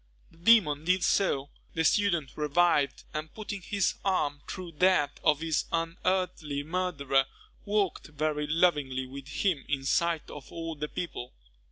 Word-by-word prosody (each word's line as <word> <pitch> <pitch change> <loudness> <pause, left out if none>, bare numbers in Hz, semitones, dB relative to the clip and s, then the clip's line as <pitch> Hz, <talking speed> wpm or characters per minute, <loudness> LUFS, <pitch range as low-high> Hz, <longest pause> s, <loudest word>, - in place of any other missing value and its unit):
The 165 - -21
demon 170 -8 +5
did 180 0 +2
so; 145 -7 +1 0.2
the 160 - +1
student 170 -5 +2
revived, 150 -2 +2
and 155 +1 -4
putting 205 -2 -6
his 200 +1 0
arm 150 -7 0
through 180 -2 -6
that 180 -6 +3
of 150 0 +3
his 160 -2 0
unearthly 165 -3 -1
murderer, 145 -6 0 0.4
walked 205 -3 0
very 150 0 -1
lovingly 150 -5 +2
with 135 +1 -9
him 145 +1 0
in 135 -2 -1
sight 170 +3 +1
of 145 -3 -10
all 165 -1 -4
the 150 0 -4
people. 125 -8 -5
160 Hz, 145 wpm, -29 LUFS, 145-180 Hz, 0.4 s, demon